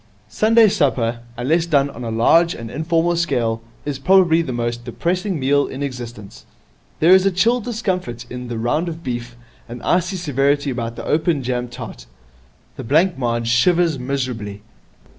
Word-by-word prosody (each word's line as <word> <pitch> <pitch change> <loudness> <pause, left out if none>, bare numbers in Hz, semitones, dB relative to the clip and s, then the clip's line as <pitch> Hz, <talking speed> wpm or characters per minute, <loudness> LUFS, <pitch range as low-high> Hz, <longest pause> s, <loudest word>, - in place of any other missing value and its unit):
Sunday 225 +1 +4
supper, 125 - 0 0.2
unless 160 +8 +1
done 140 -3 +2
on 125 - -9
a 115 - -3
large 165 +10 +3
and 115 -1 -8
informal 165 +2 0
scale, 120 -9 0 0.2
is 145 -2 -3
probably 175 +1 +4
the 160 - -4
most 120 0 -3
depressing 175 - -2
meal 140 +2 +2
in 135 +2 -5
existence. 120 -6 -7 0.6
There 165 +3 +5
is 190 0 +6
a - - +3
chill 230 +7 +2
discomfort 185 - -3
in 125 0 -7
the 120 -1 -4
round 135 +10 0
of 165 0 -8
beef, 120 -1 -5 0.3
an 120 +1 -7
icy 180 +1 +1
severity 145 -4 0
about 115 -2 -4
the - - -7
open 155 -2 +1
jam 125 0 -2
tart. 115 - -9 0.7
The - - -6
blancmange 130 -6 +1
shivers 165 +5 +3
miserably. 125 -6 -4
140 Hz, 160 wpm, -20 LUFS, 120-170 Hz, 0.7 s, is